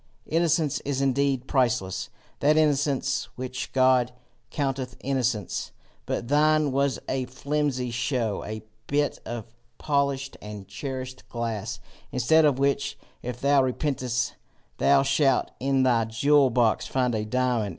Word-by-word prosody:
Innocence 165 -2 +1
is 140 -1 -2
indeed 135 -1 +1
priceless 120 -10 0 0.3
that 150 +2 +4
innocence 145 -3 +2
which 130 0 -5
God 130 -2 +4 0.4
counteth 135 -3 -2
innocence, 125 -8 -1 0.3
but 120 - -2
thine 150 +1 +3
was 140 0 +1
a 130 -1 -1
flimsy 135 -1 -1
show, 125 -4 -1
a 110 0 -6 0.2
bit 145 0 0
of 115 -1 -6 0.2
polished 140 -2 0
and 105 -2 -8
cherished 130 -2 -6
glass 115 -4 -3 0.3
instead 155 +6 +4
of 145 -4 +3
which, 140 +1 0 0.2
if 125 0 -5
thou 140 0 +4
repentest, 130 -2 -1 0.5
thou 140 -1 +5
shalt 135 -2 +2
in 135 0 +2
thy 120 -3 +3
jewel 140 +5 +4
box 115 -2 +2
find 125 -2 0
a 110 -1 -1
diamond. 120 -1 0
130 Hz, 130 wpm, -26 LUFS, 125-140 Hz, 0.5 s, thou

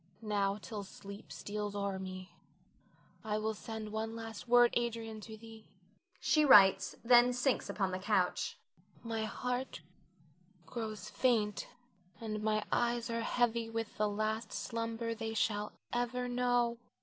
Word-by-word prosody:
Now, 200 -2 +1
till 210 0 -6
sleep 200 +2 -10
steals 205 0 -4
o'er 200 -1 -2
me, 185 0 -7 0.9
I 215 -1 -1
will 220 +1 -1
send 220 0 -6
one 220 +1 -3
last 225 0 -7
word, 240 0 +6
Adrian, 230 -2 -2
to 220 +1 -9
thee. 225 0 -13 0.5
[She 305 - +3
writes, 200 -9 +7
then 240 +1 +6
sinks 250 +1 +1
upon 195 -2 0
the 185 - -2
couch.] 185 -2 +1 0.5
My 225 -1 -2
heart 250 +3 -3 0.8
grows 220 -3 -5
faint, 215 -4 +1 0.5
and 215 -2 -4
my 215 0 +1
eyes 235 -1 +1
are 230 0 -1
heavy 235 -1 +1
with 225 -1 -4
the 210 0 +3
last 215 +1 -2
slumber 230 0 -3
they 225 0 -4
shall 210 -1 0 0.2
ever 245 +1 -1
know. 245 -1 +1
225 Hz, 135 wpm, -34 LUFS, 210-235 Hz, 0.9 s, writes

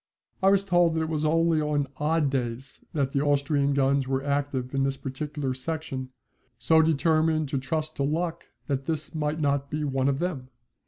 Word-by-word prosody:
I 190 - +5
was 195 0 +3
told 175 -3 +3
that 160 - +1
it 160 - -3
was 155 -1 -1
only 165 0 +3
on 150 -1 0
odd 150 -1 +1
days 130 0 -4
that 140 -3 0
the 140 - +1
Austrian 140 -1 +2
guns 135 -1 +2
were 135 0 -1
active 140 -2 -1
in 135 - +1
this 135 0 0
particular 140 0 -4
section, 130 -1 -4 0.5
so 160 -1 +4
determined 155 -1 +2
to 140 - -1
trust 155 +3 -3
to 140 - 0
luck 165 +3 -1 0.2
that 135 -2 -2
this 160 0 -3
might 155 0 -1
not 140 -2 0
be 150 +1 -2
one 135 -1 +1
of 135 - 0
them. 140 -7 -3
145 Hz, 190 wpm, -27 LUFS, 135-160 Hz, 0.5 s, I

